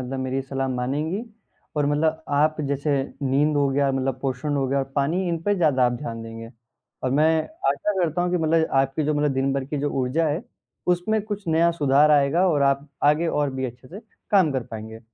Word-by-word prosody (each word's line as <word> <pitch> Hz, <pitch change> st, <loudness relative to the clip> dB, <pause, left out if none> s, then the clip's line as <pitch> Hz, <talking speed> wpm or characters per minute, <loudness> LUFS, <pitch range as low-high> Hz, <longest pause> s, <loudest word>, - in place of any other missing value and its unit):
मतलब 130 Hz, +1 st, -4 dB
मेरी 130 Hz, +1 st, -2 dB
सलाह 135 Hz, 0 st, -3 dB
मानेंगी 145 Hz, -, -2 dB, 0.5 s
और 145 Hz, -1 st, +2 dB
मतलब 155 Hz, +2 st, +1 dB
आप 150 Hz, +2 st, +2 dB
जैसे 140 Hz, +2 st, -1 dB, 0.3 s
नींद 145 Hz, +3 st, +2 dB
हो 140 Hz, -1 st, +3 dB
गया 140 Hz, 0 st, +1 dB
मतलब 130 Hz, -1 st, -1 dB
पोषण 135 Hz, +2 st, -2 dB
हो 135 Hz, -, 0 dB
गया 140 Hz, -, +1 dB
और 135 Hz, 0 st, -4 dB
पानी 165 Hz, +7 st, +1 dB
इन 170 Hz, -1 st, -1 dB
पे 205 Hz, +3 st, +1 dB
ज़्यादा 150 Hz, -9 st, +3 dB
आप 120 Hz, -, 0 dB
ध्यान 120 Hz, -3 st, -5 dB
देंगे। 115 Hz, 0 st, -9 dB, 0.5 s
और 130 Hz, -, 0 dB
मैं 155 Hz, +3 st, +3 dB, 0.3 s
आशा 210 Hz, -, 0 dB
करता 170 Hz, +1 st, 0 dB
हूँ 180 Hz, -, 0 dB
कि 180 Hz, -, +1 dB
मतलब 160 Hz, 0 st, +2 dB
आपकी 135 Hz, +3 st, -1 dB
जो 150 Hz, +1 st, +1 dB
मतलब 145 Hz, -1 st, +1 dB
दिन-भर 135 Hz, 0 st, 0 dB
की 145 Hz, +2 st, -4 dB
जो 145 Hz, +1 st, -1 dB
ऊर्जा 135 Hz, +6 st, +1 dB
है, 155 Hz, +7 st, -2 dB, 0.4 s
उसमें 180 Hz, +5 st, +1 dB
कुछ 205 Hz, -3 st, -6 dB
नया 165 Hz, +1 st, +3 dB
सुधार 145 Hz, -1 st, +4 dB
आएगा 150 Hz, +5 st, +4 dB
और 145 Hz, -4 st, +2 dB
आप 140 Hz, +1 st, +1 dB, 0.2 s
आगे 150 Hz, +3 st, +3 dB
और 145 Hz, -3 st, 0 dB
भी 130 Hz, 0 st, -2 dB
अच्छे 125 Hz, +1 st, -11 dB
से 195 Hz, +8 st, -9 dB, 0.3 s
काम 185 Hz, -7 st, +4 dB
कर 130 Hz, -2 st, -1 dB
पाएँगे। 110 Hz, 0 st, -8 dB
145 Hz, 210 wpm, -24 LUFS, 135-160 Hz, 0.5 s, सुधार